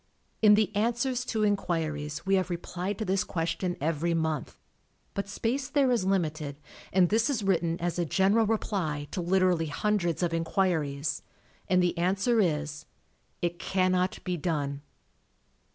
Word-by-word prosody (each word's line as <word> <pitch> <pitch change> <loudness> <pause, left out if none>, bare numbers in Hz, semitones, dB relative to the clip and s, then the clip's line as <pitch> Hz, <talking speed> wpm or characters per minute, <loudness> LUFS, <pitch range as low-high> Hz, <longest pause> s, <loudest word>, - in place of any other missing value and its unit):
In 210 -1 +8
the 210 -1 +1
Answers 240 +4 0
to 220 -3 -1
Inquiries 160 -7 -1
we 195 - +1
have 185 -1 +2
replied 180 +3 -3
to 220 - -3
this 190 0 +1
question 175 +2 -2
every 165 +3 0
month, 160 -4 -2 0.6
but 200 0 -3
space 250 +6 -2
there 280 -4 +3
is 230 -6 +1
limited, 155 -6 -1 0.4
and 180 -2 +4
this 225 +5 +2
is 240 -7 -1
written 170 -3 +1
as 175 0 -2
a 175 - +1
general 200 +6 +3
reply 175 -9 -1
to 180 - -2
literally 180 -2 +2
hundreds 175 +1 0
of 170 -1 0
inquiries, 160 -4 0 0.5
and 185 -1 +4
the 175 0 +1
answer 195 +7 +2
is: 150 -4 -1 0.6
"It 175 0 -1
cannot 185 +1 +1
be 180 -2 -2
done." 145 -4 -2
180 Hz, 150 wpm, -28 LUFS, 165-205 Hz, 0.6 s, In